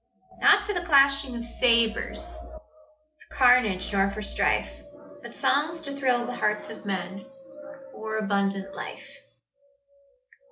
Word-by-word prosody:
Not 415 -1 +5
for 415 - -2
the 350 -2 -2
clashing 275 -4 +3
of 235 0 -5
sabres, 230 -1 +1
For 315 0 -14 0.7
carnage 245 -7 +3
nor 195 0 +2
for 210 +2 -6
strife; - - 0 0.5
But 235 -3 -11
songs 290 +4 +1
to 280 -3 -7
thrill 250 -3 +1
the 245 - -5
hearts 210 0 -1
of - - -11
men 190 0 -3 0.5
With 275 -1 -14
more 220 0 -5
abundant 195 -2 -1
life. 275 +7 -9
245 Hz, 130 wpm, -26 LUFS, 210-280 Hz, 0.7 s, Not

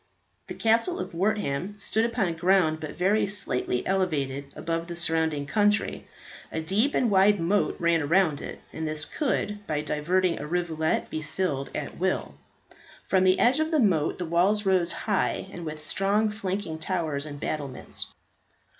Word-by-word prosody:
The - - -6
Castle 230 +11 +2
of - - -5
Wortham 190 -1 -1
stood 220 +3 0
upon 225 -7 0
ground 170 -2 +3
but 155 -2 -6
very 200 +5 +2
slightly 125 -10 -1
elevated 145 -8 0
above 165 0 -3
the 170 - -5
surrounding 160 -3 0
country. 210 +5 +1 0.4
A - - -2
deep 200 - +1
and 240 -4 +2
wide 200 +1 +5
moat 190 +5 +1
ran 165 -4 +2
round 170 -5 +3
it, - - -7
and 160 - -3
this 155 0 -3
could, 210 -8 -1
by 150 -1 0
diverting 170 +5 +1
a 150 - -5
rivulet, 160 -2 -1
be 155 - -3
filled 155 -3 -2
at 150 - -5
will. 185 +1 0 0.7
From 190 -1 +3
the 185 0 +5
edge 255 +4 +4
of 315 0 +1
the 315 -2 +2
moat 180 - +2
the 180 - -3
walls 190 +6 +2
rose 185 -3 +2
high, 200 -2 -1
and 175 -3 -7
with 155 0 -5
strong 200 +7 +1
flanking 195 -5 -3
towers 155 -4 -1
and 145 -1 -7
battlements. 145 -3 -3
175 Hz, 165 wpm, -27 LUFS, 155-205 Hz, 0.7 s, wide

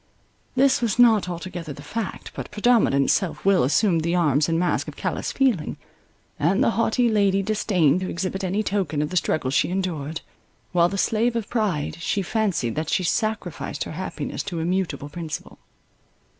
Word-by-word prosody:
This 265 -1 +4
was 230 -3 0
not 225 -6 +5
altogether 175 -2 -6
the 145 - -11
fact: 210 +6 -5
but - - -6
predominant 210 - +3
self 190 -1 -1
will 195 -2 +5
assumed 165 - +2
the 170 +2 0
arms 150 -3 +2
and 165 - +1
masque 175 +1 0
of - - -7
callous - - -3
feeling; 245 - +1 0.6
and 170 +6 +2
the - - +3
haughty 230 +2 +2
lady 200 -3 +2
disdained 185 -7 +2
to 185 - -3
exhibit 190 +2 -3
any 190 +3 0
token 185 -8 -1
of 150 - -4
the - - -4
struggle 155 -5 0
she 135 - +2
endured; 165 -4 -3 0.5
while 175 -1 +4
the 195 - -4
slave 230 +4 +1
of 230 -3 -3
pride, 205 -11 -1
she 195 +3 -1
fancied 190 - 0
that 155 0 -3
she 185 - +1
sacrificed 180 - -2
her - - -7
happiness 185 +4 -4
to 185 -4 -5
immutable 165 -4 -1
principle. 160 +1 -7
185 Hz, 170 wpm, -24 LUFS, 160-210 Hz, 0.6 s, not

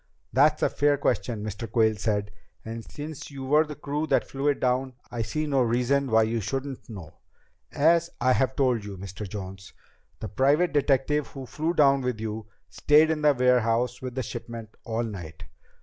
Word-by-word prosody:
"That's 150 +3 +4
a - - +4
fair 145 0 +2
question," 115 -5 -1
Mr. 110 +1 -6
Quayle 110 -2 +3
said. 105 -1 -1 0.3
"And 115 +1 -6
since 150 0 -7
you 135 -2 -7
were 150 +3 +3
the 150 - -7
crew 150 +2 -3
that - - +2
flew 135 +1 -3
it 145 - +2
down, 130 +1 0 0.2
I 120 - -3
see 155 +7 -2
no 140 -3 +1
reason 125 +3 +1
why 110 -1 +5
you 115 +1 -1
shouldn't 135 +4 -4
know. 90 -8 -9 0.6
As 170 +3 +3
I 130 +1 +3
have 130 0 +1
told 125 -5 +1
you, 100 -2 -7
Mr. 95 +2 -7
Jones, 95 -1 -8 0.5
the 110 - -5
private 145 - +2
detective 145 0 +2
who 135 -2 -8
flew 155 +7 -2
down 140 -3 +5
with 125 -3 -2
you, 110 0 -5 0.2
stayed 155 +2 +4
in 155 -1 -1
the 150 -1 +4
warehouse 125 -1 +2
with 130 -1 -6
the 130 - -1
shipment 115 -1 -7
all 115 +1 -1
night. 90 -8 -7
125 Hz, 185 wpm, -26 LUFS, 110-145 Hz, 0.6 s, why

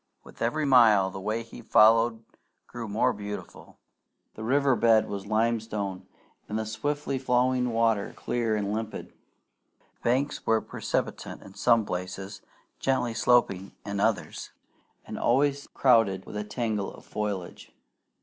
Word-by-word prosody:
With - - -16
every 150 +7 0
mile 110 -8 +5
the 95 - -7
way 110 +4 -2
he 115 +1 -12
followed 115 +1 +4 0.4
grew 120 -2 -7
more 115 +5 +1
beautiful. 105 -1 -8 0.6
The 110 - -8
river 135 +2 +3
bed 115 -1 +4
was 100 0 -6
limestone, 110 -3 -1 0.4
and 105 - -2
the 110 - -2
swiftly 140 +5 -2
flowing 125 0 +1
water, 115 -3 +1
clear 115 -3 -1
and 105 -1 -2
limpid. 110 0 -5
The - - -39
banks 130 +4 0
were 110 0 +3
precipitate - - -4
in 95 - -13
some 115 +2 +3
places, 95 +2 -5 0.4
gently 130 -3 0
sloping 110 -5 +2
in 100 -1 -3
others, - - -1 0.6
and - - -6
always 140 +3 +1
crowded 115 -7 +3
with - - -9
a 105 - -2
tangle 105 -2 -2
of - - -14
foliage. 100 -4 -5
110 Hz, 140 wpm, -27 LUFS, 105-120 Hz, 0.6 s, mile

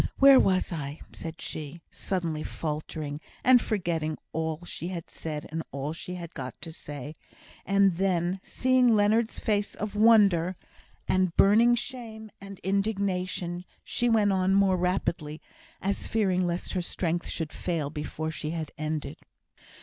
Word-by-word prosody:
Where 275 -1 +9
was 185 -1 +2
I?" 150 -2 -4
said 160 0 -7
she, 155 +2 -5
suddenly 170 -5 -2
faltering, 150 -1 -4 0.2
and 255 -1 +7
forgetting 165 -7 -1 0.2
all 160 +1 -2
she 170 - -5
had 175 -3 -6
said 150 -2 -5
and 165 +1 -2
all 140 +3 -3
she 180 +2 -6
had 175 -1 -7
got 130 -3 -7
to 165 - -6
say; 145 -1 -8 0.5
and 195 -3 +4
then, 185 -1 +1
seeing 255 -1 +3
Leonard's 215 +2 +2
face 205 -2 0
of 210 0 -4
wonder, 200 -5 +5 0.5
and 185 -2 +1
burning 230 +4 +6
shame 225 -3 -6
and 195 -1 -9
indignation, 190 -3 -1 0.2
she 240 0 0
went 215 -3 +4
on 190 0 +2
more 195 -1 +4
rapidly, 175 -4 -1 0.4
as 200 +1 -1
fearing 185 -5 +1
lest 175 +1 -3
her 185 - 0
strength 175 0 -1
should 160 -2 -3
fail 160 -5 -2
before 155 +1 -4
she 155 -1 -4
had 160 -2 -4
ended. 155 -1 -3
180 Hz, 145 wpm, -28 LUFS, 160-200 Hz, 0.5 s, Where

